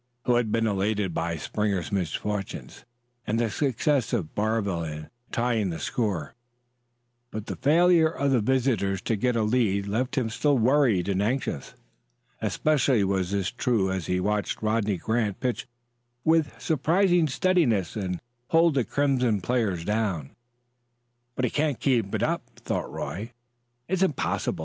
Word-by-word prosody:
He 125 - +3
had 120 -3 +1
been 115 0 +1
elated 100 -2 0
by 85 0 -2
Springer's 100 +1 -2
misfortune 100 +2 -3 0.6
and 110 +2 0
the 115 -2 0
success 135 -1 0
of 95 -10 -1
Barville 105 -5 0
in 75 -1 -6 0.2
tying 115 -4 0
the 80 - -4
score, 100 - -2 1.0
but 110 -2 -6
the - - -5
failure 165 +2 +4
of 140 -3 -1
the 130 - +4
visitors 115 -5 +1
to 115 - 0
get 125 +4 0
a 115 - +2
lead 105 -3 +1
left 125 +7 -2
him 115 -4 0
still 145 +5 +2
worried 120 -6 +3
and 100 -1 +1
anxious. 110 - -2 0.7
Especially 135 -7 +2
was 95 -2 0
this 100 -1 -1
true 115 -6 +1
as 95 -3 -3
he 90 - +1
watched 105 +3 -1
Rodney 110 -2 +1
Grant 110 +2 -1
pitch 125 0 -2 0.6
with 160 -2 +2
surprising 175 +3 +2
steadiness 135 - +1
and 95 -4 -3 0.3
hold 165 0 +4
the 135 -3 +2
crimson 125 -6 +1
players 95 -5 -1
down. 105 -10 -1 1.0
"But 130 - 0
he 120 - -1
can't 150 -3 0
keep 120 -8 +1
it - - -1
up," - - 0
thought - - -3
Roy; 110 +7 -5 0.5
"it's 190 +1 -1
impossible. 155 - 0
110 Hz, 150 wpm, -26 LUFS, 100-130 Hz, 1.0 s, failure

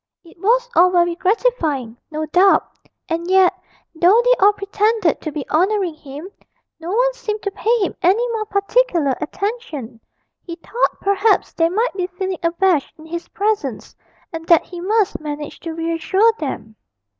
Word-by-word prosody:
It 335 - -18
was 480 +6 +2
all 360 +2 +6
very 345 -1 +2
gratifying, 335 - 0
no 310 0 -3
doubt 365 +5 +4 0.4
and 340 0 -3
yet, 380 0 +5 0.4
though 355 +7 +4
they - - +6
all 410 - +7
pretended 410 -2 0
to 310 - -4
be 290 -2 -5
honouring 375 +1 +1
him, 305 +4 -10 0.5
no 330 +1 -7
one - - +2
seemed 430 -4 -5
to 400 - -2
pay 455 +4 +1
him 385 - -1
any 410 +8 +3
more 440 -2 -2
particular 395 - +1
attention; 305 - -5 0.4
he 335 - -8
thought 460 +8 -2
perhaps 400 +2 +2
they 330 0 +2
might 445 +7 0
be 365 -2 -2
feeling 370 0 -4
abashed 340 -2 0
in 315 - -14
his 340 +1 -6
presence, 425 +1 -2 0.4
and 325 0 -7
that 335 -2 +5
he 350 -1 -9
must 425 +2 +1
manage 295 -1 -6
to 330 -1 -6
reassure 335 +7 +1
them. 220 -7 -6
365 Hz, 160 wpm, -19 LUFS, 325-420 Hz, 0.5 s, all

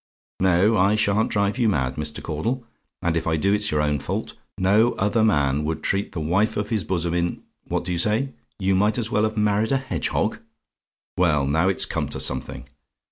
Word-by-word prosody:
No, 95 +4 +3
I 100 +3 +4
sha'n't 105 0 +2
drive 100 +4 0
you 115 -3 +3
mad, 65 -8 0
Mr. 75 0 -5
Caudle; 115 - -3 0.4
and 85 -1 +1
if 80 0 -1
I 80 0 +1
do 100 +6 +2
it's 105 0 0
your 75 0 +1
own 75 -1 0
fault. - - -4 0.2
No 105 +6 +3
other 105 +3 +1
man 75 -8 +2
would 80 0 -3
treat 100 +1 -1
the 85 - -3
wife 100 +8 +1
of 105 0 -2
his 110 -5 0
bosom 85 -2 -1
in 85 0 -1 0.2
What - - -2
do 90 - -3
you 85 - -1
say? 110 +8 +1 0.3
"YOU 95 -1 +1
MIGHT 105 +4 +2
AS 120 -1 -2
WELL 105 - +2
HAVE 110 0 -3
MARRIED 105 +2 +1
A - - +4
HEDGEHOG? 130 0 -2 0.8
"Well, 75 -6 +3
now 80 +6 +2
it's 95 - +2
come - - -3
to - - -4
something! - - -3
95 Hz, 205 wpm, -23 LUFS, 80-105 Hz, 0.8 s, I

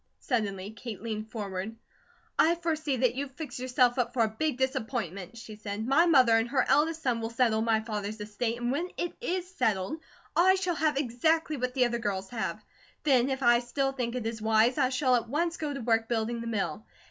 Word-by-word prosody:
Suddenly 205 -5 -2
Kate 220 -2 -8
leaned 220 -1 -4
forward. 205 -1 -4 0.6
"I 335 +2 +5
foresee 315 -5 -1
that 250 -1 +2
you've 270 0 -5
fixed 290 -6 -6
yourself 250 0 +2
up 245 0 0
for 235 - +4
a - - +3
big 275 +5 -1
disappointment," 235 - -2
she 225 -2 -9
said. 210 +1 -4
"My 295 +7 +4
mother 255 -8 +6
and 225 +1 0
her 260 -1 +2
eldest 320 +2 +2
son 240 -3 +1
will 225 - -2
settle 230 -2 +2
my 225 -1 +2
father's 215 -1 -4
estate; 225 +3 -3
and 240 0 -1
when 335 +7 -1
it 350 - -2
is 365 -5 -2
settled 220 - -1 0.4
I 375 +3 +6
shall 370 -2 0
have 305 -2 +1
exactly 305 +5 +1
what 255 -2 -3
the 255 -2 +4
other 235 0 -1
girls 195 -3 -3
have. 230 -2 -3 0.4
Then 265 -3 +4
if 265 0 -2
I 240 0 +6
still 270 +3 -1
think 250 -3 -3
it 245 -3 -3
is 225 -1 -3
wise, 220 +5 +3
I 260 -2 +3
shall 255 0 +2
at 235 -1 -1
once 335 +5 0
go 300 -2 -3
to 275 -2 -5
work 225 -1 +1
building 230 0 -1
the 230 - -5
mill. 200 -4 -2
240 Hz, 210 wpm, -29 LUFS, 220-280 Hz, 0.6 s, mother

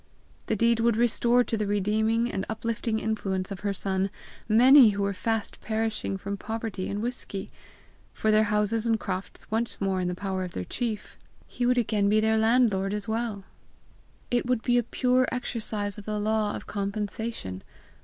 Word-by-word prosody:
The 220 - +1
deed 230 +2 +3
would 230 -1 +2
restore 240 +1 +3
to 230 - -2
the 210 -2 -1
redeeming 220 +3 +1
and 190 - -2
uplifting 225 0 -2
influence 200 -3 -2
of 195 - -5
her 205 - -1
son 195 0 -1 0.4
many 250 +3 +8
who 200 - 0
were 200 0 0
fast 225 +2 -2
perishing 220 -3 -2
from 200 +1 -4
poverty 220 -2 -4
and 205 +2 -3
whisky; 235 -5 -4 0.6
for, 220 - 0
their 215 0 +5
houses 210 +2 0
and 225 -1 +2
crofts 185 +1 -5
once 230 +2 -1
more 195 -2 0
in 180 - -1
the 180 - -2
power 190 0 -3
of 180 - -6
their 90 - -4
chief, 230 -4 -4 0.3
he 245 - -2
would 250 0 +3
again 210 -4 +2
be 215 +1 +4
their 220 0 +2
landlord 220 -4 +3
as 210 +1 -3
well! 220 -3 -2 0.9
It 240 0 +1
would 250 -3 +1
be 245 -1 +3
a - - +3
pure 255 +2 +1
exercise 215 -5 -2
of 205 - -11
the 215 -1 -2
law 215 0 0
of - - -7
compensation! 200 - -4
215 Hz, 180 wpm, -27 LUFS, 200-230 Hz, 0.9 s, many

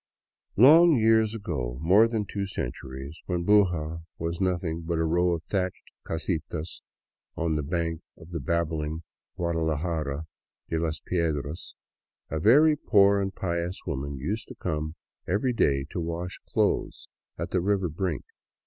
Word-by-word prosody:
Long 160 - +8
years 110 -1 +4
ago, 65 - -3
more 95 +9 +5
than 110 -3 -1
two 100 0 -3
centuries, 65 -1 -6
when 90 -2 -1
Buga 85 -6 +2
was 85 +2 -3
nothing 90 -3 0
b^t 85 +1 -2
a 80 - +1
row 85 +2 +2
of 85 -1 -3
thatched 95 -2 -2 0.2
casitas 80 -1 -3 0.5
on 80 -1 0
the 75 - 0
bank 85 +2 -2 0.2
of 80 +3 -14
the 85 - -3
babbling 80 +1 -1 0.3
Guadalajara 80 -3 -1 0.4
de 80 - 0
las 80 -2 -1
Piedras, 80 -3 -2 0.6
a 80 - -1
very 150 - +6
poor 100 -7 +4
and 95 0 -3
pious 85 0 -2
woman 70 +1 -3
used 100 +12 -3
to - - -10
come 75 -2 -3 0.3
every 110 +7 +1
day 70 -11 +2
to - - -3
wash 85 +2 -4
clothes - - 0 0.3
at - - -4
the 90 - +1
river 95 0 +1
brink. 85 -2 -3
85 Hz, 145 wpm, -27 LUFS, 80-95 Hz, 0.6 s, Long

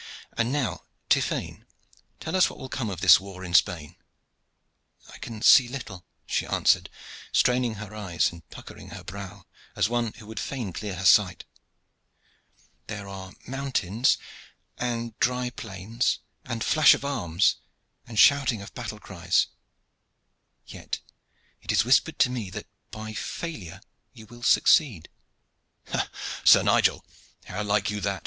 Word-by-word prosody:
"And 115 +1 0
now, 140 -5 -2 0.2
Tiphaine, - - 0 0.5
tell - - -4
us 185 - +5
what - - -11
will 130 - -8
come 125 -5 -3
of 95 -3 -6
this - - +8
war 95 -1 -10
in 90 - -7
Spain." 85 -2 +2 1.2
"I - - -12
can 110 -2 -7
see 125 - +8
little," 115 -8 -8 0.2
she - - -1
answered, - - +2 0.4
straining 125 -2 +2
her 105 0 -9
eyes 100 -5 0
and 85 -2 -15
puckering - - -11
her - - -9
brow, 100 0 -9 0.3
as - - +1
one 120 -2 -1
who 110 - -14
would 110 +1 -7
fain 120 -9 -4
clear 100 0 -5
her 95 +2 -5
sight. 95 -3 +4 1.4
"There 100 -2 -6
are 95 -1 -9
mountains, 130 -4 0 0.6
and 120 -2 -3
dry 125 0 0
plains, 110 +2 -2 0.3
and 120 -4 -3
flash 155 -1 +6
of - - -7
arms 90 - +1 0.5
and 115 -2 -8
shouting 140 -3 +5
of 100 - -12
battle 105 - -6
cries. 90 -3 0 1.2
Yet - - -6 0.6
it - - -3
is - - +3
whispered 140 +6 +3
to 125 - +3
me 115 -6 -4
that 105 +2 -7 0.2
by 110 0 -7
failure 105 - -6 0.3
you 110 -3 -13
will 120 +2 -14
succeed." 120 - +3 0.8
"Ha! - - -1 0.3
Sir - - +7
Nigel, - - +2 0.4
how 105 - -5
like 105 0 +1
you 105 0 -4
that?" 100 -1 -1
110 Hz, 145 wpm, -26 LUFS, 95-125 Hz, 1.4 s, this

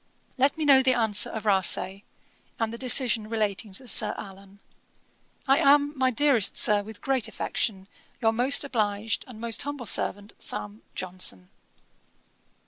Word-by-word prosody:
'Let 275 +2 +1
me 315 - -2
know 275 -2 +7
the 260 -1 +2
answer 220 -3 +3
of 220 -1 -7
Rasay, 190 -1 +1 0.6
and 225 0 -2
the - - -6
decision 240 -4 +1
relating 215 -2 -2
to 250 +7 -8
Sir 210 -1 +1
Allan. 195 0 -11 0.9
'I 270 +1 +4
am, 290 -1 +4
my 260 -1 +2
dearest 250 -4 +2
Sir, 210 -1 +4
with 210 0 -10
great 265 -4 -1
affection, 195 -3 -3 0.3
'Your 225 -2 +2
most 250 +6 +3
obliged, 215 -5 -2
and 240 -4 -12
'Most 230 -1 -1
humble 285 -3 -5
servant, 205 0 -1
'SAM. 105 +1 -6
JOHNSON.' 180 - -4
220 Hz, 145 wpm, -26 LUFS, 200-260 Hz, 0.9 s, know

